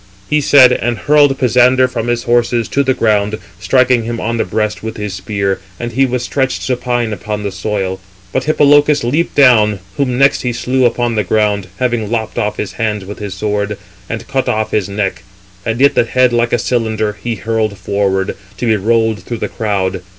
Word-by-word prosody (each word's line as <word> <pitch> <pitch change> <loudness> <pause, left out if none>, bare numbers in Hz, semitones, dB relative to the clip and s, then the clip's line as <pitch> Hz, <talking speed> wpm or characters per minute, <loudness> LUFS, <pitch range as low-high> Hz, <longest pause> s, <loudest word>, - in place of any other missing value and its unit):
He 150 0 +1
said, 135 -2 +6
and 120 +2 -1
hurled 145 +1 +3
Pisander 125 +1 +4
from 120 -2 -4
his 120 0 -1
horses 120 -1 +1
to 140 - +1
the 130 -2 +1
ground, 105 -1 +1 0.2
striking 125 +5 +3
him 115 0 -4
on 115 +1 -2
the - - +1
breast 105 -1 -2
with 110 0 -6
his 105 -2 -4
spear; 100 -1 -2 0.2
and 120 0 -4
he 135 +3 +2
was 125 -1 -2
stretched 130 +1 -1
supine 120 -3 -1
upon 105 0 -5
the 100 - -3
soil. 95 -1 -3 0.3
But 130 - -1
Hippolochus 145 -1 +4
leaped 145 +8 0
down, 110 -7 +5 0.2
whom 125 -3 0
next 140 +1 +3
he 125 -1 -2
slew 130 +2 0
upon 120 0 +1
the 105 -2 0
ground, 105 -1 0
having 120 -3 -1
lopped 115 0 -2
off 105 -2 -2
his 100 - -3
hands 105 -3 -2
with 105 +2 -8
his 100 -2 -5
sword, 105 0 -2 0.3
and 115 +1 -5
cut 135 -1 -1
off 110 0 -1
his 100 -2 0
neck; 100 -2 -2 0.5
and 115 +1 -1
it 140 +1 +5
(the - - +3
head) 125 0 +2
like 120 0 +1
a - - +3
cylinder, 110 -3 -1
he 120 -1 -2
hurled 110 -1 -2
forward, 95 0 -1 0.2
to - - -3
be 110 -2 +2
rolled 110 0 +1
through 120 +5 -5
the - - -3
crowd. 100 -5 -2
115 Hz, 200 wpm, -15 LUFS, 105-125 Hz, 0.5 s, said